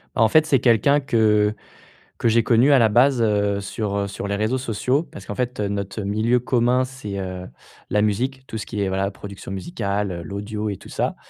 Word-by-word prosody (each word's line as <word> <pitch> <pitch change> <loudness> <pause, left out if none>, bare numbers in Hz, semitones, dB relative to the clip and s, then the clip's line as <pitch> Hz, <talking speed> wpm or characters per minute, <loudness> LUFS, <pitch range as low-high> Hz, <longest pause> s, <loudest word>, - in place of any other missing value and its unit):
En 110 - +4
fait, 155 +3 +5
c'est 135 -5 +3
quelqu'un 125 +4 +4
que 110 -5 +2 0.6
que - - +1
j'ai 115 +1 +4
connu 120 +5 +4
à 135 - +6
la 115 - +5
base, 125 +2 +4
heu, 100 -2 +1
sur, 100 0 -3
heu, 100 0 -1
sur 100 0 -5
les 100 - -1
réseaux 110 +5 0
sociaux 125 +6 0
parce 100 - -12
qu'en 105 - -6
fait 125 -2 -3
notre 100 0 -3
milieu 110 +5 +1
commun 125 +1 +2
c'est, 125 -7 -7
heu, 90 -1 -5 0.4
la 105 +1 +2
musique, 130 +6 -1
tout 110 - -5
ce - - -5
qui 105 -3 -4
est, 100 - 0
voilà, 95 +1 -1
production 100 -1 -9
musicale, 100 - -3
l'audio 105 +4 -4
et 100 - -4
tout - - -14
ça, - - -2
105 Hz, 205 wpm, -22 LUFS, 100-125 Hz, 0.6 s, à